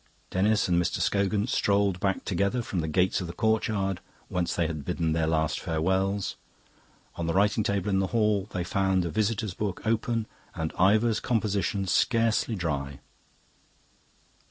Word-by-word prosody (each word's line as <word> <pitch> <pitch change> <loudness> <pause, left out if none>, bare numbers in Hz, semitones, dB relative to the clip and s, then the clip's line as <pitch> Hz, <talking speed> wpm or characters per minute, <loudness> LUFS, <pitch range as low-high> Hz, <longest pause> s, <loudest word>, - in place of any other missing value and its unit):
Denis 105 +3 +2
and 85 -1 +3
Mr. 90 - -1
Scogan 100 +1 +1
strolled 100 -5 +1
back 95 0 -1
together 100 +6 0
from 95 - -3
the 80 - -2
gates 90 +4 +1
of 90 - -4
the 85 - -6
courtyard, 105 -3 0 0.3
whence 90 -1 -1
they 85 - +1
had 80 -3 -4
bidden 80 +2 -1
their 80 -1 +1
last 80 -3 0
farewells; 95 +5 -1 0.8
on 85 - -2
the 85 - -1
writing 105 +2 +3
table 100 0 -1
in 95 -2 +2
the 95 - +1
hall 105 -2 +1
they 90 - -2
found 95 0 +1
the 85 - -3
visitor's 110 0 -1
book, 100 0 -4
open, 115 0 0 0.3
and 80 -1 -3
Ivor's 110 +4 +3
composition 100 -3 0
scarcely 115 +4 +2
dry. 70 -7 -3
95 Hz, 155 wpm, -27 LUFS, 85-105 Hz, 0.8 s, and